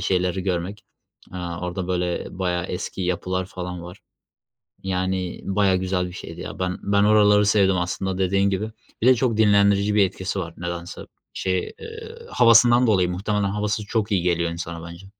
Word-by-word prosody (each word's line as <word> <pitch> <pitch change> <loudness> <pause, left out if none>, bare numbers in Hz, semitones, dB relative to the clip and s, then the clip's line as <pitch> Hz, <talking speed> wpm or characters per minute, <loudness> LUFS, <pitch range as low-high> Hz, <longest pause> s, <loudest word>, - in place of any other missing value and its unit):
şeyleri 90 0 0
görmek, 95 +2 -3 0.5
eee, 90 - -6
orada, 90 +1 -4
böyle, 90 -1 -1
bayağı 90 -1 -1
eski 90 +1 -5
yapılar 90 +1 -1
falan 90 -1 -6
var. 90 +2 -10 0.8
Yani 95 -1 -2
bayağı 95 -1 +2
güzel 90 -1 -1
bir - - -10
şeydi - - -9
ya. - - -7
Ben 90 0 -2
ben 100 0 +2
oraları 105 -1 +5
sevdim 100 -2 +3
aslında 95 +1 -2
dediğin 100 +1 +2
gibi 100 +3 -2 0.3
bir - - +3
de 130 - +8
çok 120 -2 0
dinlendirici 100 -1 +4
bir 105 -2 +5
etkisi 95 +2 -4
var. 85 -2 -6
Nedense 85 0 -6 0.3
şey, 95 -1 -1 0.2
eee, 455 0 -9 0.2
havasından 120 +1 +6
dolayı 95 -5 +3
muhtemelen, 100 +3 -1
havası 105 +1 -2
çok 110 -1 -1
iyi 90 -3 +2
geliyor 85 -1 +1
insana 85 0 -6
bence. 85 +3 -12
95 Hz, 165 wpm, -23 LUFS, 90-105 Hz, 0.8 s, de